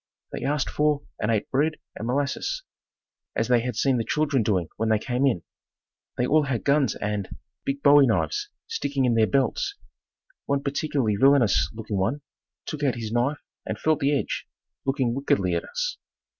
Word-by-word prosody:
They - - -5
asked 145 +1 0
for 150 -1 +1 0.2
and 105 - 0
ate 110 -3 0
bread 150 +4 +2 0.2
and 115 - -5
molasses, 140 - -1 0.7
as - - 0
they 125 -1 +5
had 120 0 -3
seen 130 +3 +2
the - - 0
children 145 -1 +1
doing 95 -6 +1
when 110 +1 0
they 110 - +4
came 125 +5 0
in. 110 -11 0 0.7
They 125 - +2
all 150 +3 +3
had 130 -4 -2
guns 140 -1 +2
and, 105 -2 -3 0.4
big 140 +1 -2
bowie 145 -1 +7
knives 80 -9 0 0.2
sticking 140 -2 -1
in 120 - +3
their 110 -1 +4
belts. 140 - 0 0.7
One 140 0 0
particularly 140 -6 0
villainous 115 - +4
looking 110 -2 -4
one 120 +10 0 0.4
took 150 - -5
out 140 -4 +1
his 115 -2 -5
knife 125 +5 0 0.2
and - - -4
felt 155 -1 +1
the 140 0 +2
edge, - - -3 0.4
looking 135 -3 +1
wickedly 100 -9 +1
at 85 - 0
us. - - -3
135 Hz, 175 wpm, -25 LUFS, 110-145 Hz, 0.7 s, bowie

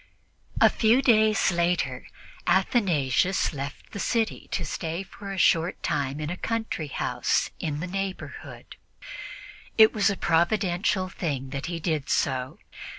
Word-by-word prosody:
A - - +8
few 235 +4 +3
days 220 -5 +4
later, 170 -7 0 0.4
Athanasius 185 - +2
left 140 0 -7
the 200 - -6
city 225 +2 -1
to 170 - -2
stay 165 +4 -3
for 195 +1 -9
a 195 - -5
short 170 -1 +2
time 140 0 -1
in 155 +1 -3
a 180 - -4
country 225 -9 -3
house 140 - 0
in 150 -2 -3
the - - -2
neighborhood. 195 +1 -6 1.0
It 220 -1 +7
was 210 -1 +3
a 200 - -2
providential 185 +2 +1
thing 140 -8 -4
that 140 -1 -4
he 170 -1 -3
did 155 -4 -2
so. 130 -1 0
175 Hz, 140 wpm, -26 LUFS, 150-200 Hz, 1.0 s, A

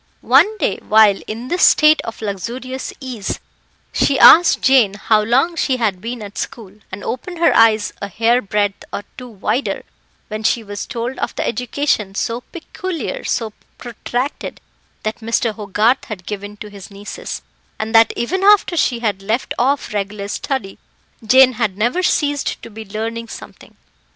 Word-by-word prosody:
One 430 +1 +5
day, - - 0
while 215 -2 +4
in 230 +3 -6
this 355 +1 -1
state 305 0 +6
of 225 -1 -8
luxurious 240 +6 -5
ease, 250 -7 -5 0.5
she 275 - +2
asked 345 +1 +8
Jane 250 -7 +4
how 215 +1 +2
long 260 +10 +2
she 265 -5 0
had 205 -6 -1
been 235 +1 -5
at 205 0 -8
school, 210 -5 -6 0.2
and 190 +2 -7
opened 345 +8 -5
her 335 - +3
eyes 220 -2 +4
a 200 - -3
hair 230 +5 +2
breadth 205 -1 -1
or 205 - -4
two 250 -1 -9
wider 230 +5 -2 0.4
when 215 0 -5
she 225 +1 +1
was 205 -2 -6
told 240 +2 -4
of - - -3
the - - -2
education 245 -5 -1
so 230 +3 -2
peculiar, 370 - -6
so 220 -3 -2 0.2
protracted, 245 +2 -4 0.4
that 215 0 -3
Mr. 230 0 0
Hogarth 210 +4 +1
had 190 -5 -8
given 205 0 -6
to 210 0 -9
his 200 -2 -11
nieces, 200 0 -7 0.3
and 220 +1 -4
that 225 0 +6
even 365 +11 -1
after 405 -3 +5
she 245 -7 +1
had 205 -4 -1
left 220 +6 -2
off 270 -1 0
regular 200 0 -3
study, 225 -4 -4 0.4
Jane 255 +3 +6
had 200 -4 0
never 240 - +1
ceased 290 -5 0
to - - -10
be 220 +1 -9
learning 225 +3 -4
something. - - -12
230 Hz, 165 wpm, -18 LUFS, 210-260 Hz, 0.5 s, asked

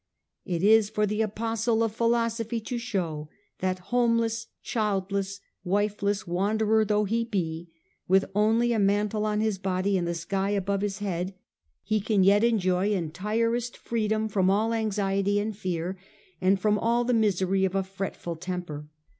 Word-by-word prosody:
It 175 -1 -2
is 215 0 +5
for 210 -1 +1
the 210 +1 -1
apostle 225 +1 0
of 225 -2 -1
philosophy 230 0 0
to 240 +2 -4
show 170 -10 -3 0.3
that, 185 0 0 0.2
homeless, 230 -2 +2 0.2
childless, 200 -2 -1 0.2
wifeless 205 +2 0
wanderer 215 +5 +2
though 210 0 +1
he 225 +3 0
be, 170 -6 -3 0.4
with 190 +1 +4
only 225 +4 +3
a 225 - +1
mantle 210 +2 +1
on 210 0 0
his 215 -3 0
body 190 0 0
and 175 - -2
the 170 - -1
sky 190 +4 -1
above 200 -1 0
his 205 -1 -2
head, 185 0 -3 0.5
he 215 0 +1
can 205 -2 +2
yet 200 +3 +5
enjoy 195 -4 +2
entirest 215 +7 -1
freedom 220 -1 -1
from 195 -3 +2
all 215 +4 +2
anxiety 200 -2 0
and 210 +1 -2
fear, 185 -1 -3 0.4
and 190 +1 +3
from 210 +1 +2
all 235 +2 +2
the 245 +1 +1
misery 195 -3 +2
of 190 0 0
a 195 - +2
fretful 190 -3 -5
temper. 170 -4 -5
205 Hz, 155 wpm, -27 LUFS, 190-220 Hz, 0.5 s, is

